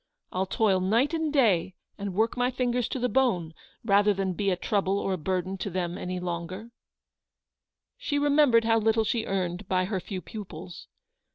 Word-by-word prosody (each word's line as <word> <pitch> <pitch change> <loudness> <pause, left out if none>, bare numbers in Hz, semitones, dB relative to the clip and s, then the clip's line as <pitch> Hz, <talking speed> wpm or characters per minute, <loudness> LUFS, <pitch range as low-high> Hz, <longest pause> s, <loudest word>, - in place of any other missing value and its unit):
I'll 190 +1 -1
toil 195 -1 +2
night 230 - +2
and 320 -2 0
day, 195 - +2 0.2
and 200 -2 -5
work 220 +3 +1
my 245 0 +1
fingers 250 -1 0
to - - -3
the 250 0 0
bone, 215 -11 +1 0.3
rather 205 -1 +4
than 190 -1 -1
be 200 +2 0
a 185 - +2
trouble 195 +1 0
or 195 -1 -1
a - - -1
burden 185 +3 -2
to 200 - -3
them 175 -1 -2
any 180 0 -4
longer/' 180 +5 -5 1.3
She 290 - -1
remembered 285 -5 +4
how 225 0 +4
little 220 +1 +2
she 220 +1 -1
earned 185 0 -2
by 185 -1 +1
her 190 -1 -2
lew 190 -3 -3
pupils. 180 -5 -9
200 Hz, 180 wpm, -27 LUFS, 185-230 Hz, 1.3 s, rather